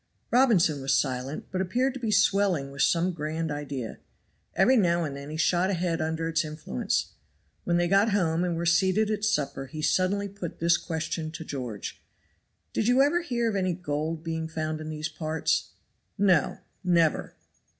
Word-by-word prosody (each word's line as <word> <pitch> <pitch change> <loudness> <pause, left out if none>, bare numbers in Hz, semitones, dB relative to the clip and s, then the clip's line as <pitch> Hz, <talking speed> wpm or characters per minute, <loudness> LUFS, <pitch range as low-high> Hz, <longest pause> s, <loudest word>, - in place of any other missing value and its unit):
Robinson 195 - +4
was 135 0 +2
silent, 130 +2 -1
but 185 - -1
appeared 250 +8 0
to 265 - -7
be 230 -3 -2
swelling 195 -9 +2
with 140 0 -4
some 175 +2 +3
grand 160 0 -3
idea. 140 -6 -5 0.6
Every 220 +8 +5
now 175 -6 +3
and 145 -3 -4
then 140 +1 -8
he 155 - -5
shot 175 +3 +2
ahead 175 -3 -1
under 160 +1 -1
its 165 +1 +1
influence. 150 - -2 0.5
When 170 - +2
they 175 0 +2
got 195 +4 +4
home 175 -5 +1
and 175 -2 0
were 170 +1 -2
seated 190 +5 +3
at 210 -1 -2
supper, 145 -9 0
he 155 +3 -7
suddenly 195 +4 +1
put 195 -4 -7
this 170 +1 +3
question 160 -1 -3
to 160 - -7
George, 125 -9 -6 0.7
"Did 215 - 0
you 250 +2 +5
ever 330 +5 +2
hear 240 -8 -1
of 220 - -1
any 185 -2 +1
gold 155 -1 -3
being 160 -1 -3
found 155 -1 -3
in 155 - -6
these 155 0 -3
parts?" 155 0 -1 0.5
"No! 190 -6 +3 0.3
never!" 170 -3 +2
165 Hz, 175 wpm, -27 LUFS, 155-195 Hz, 0.7 s, Every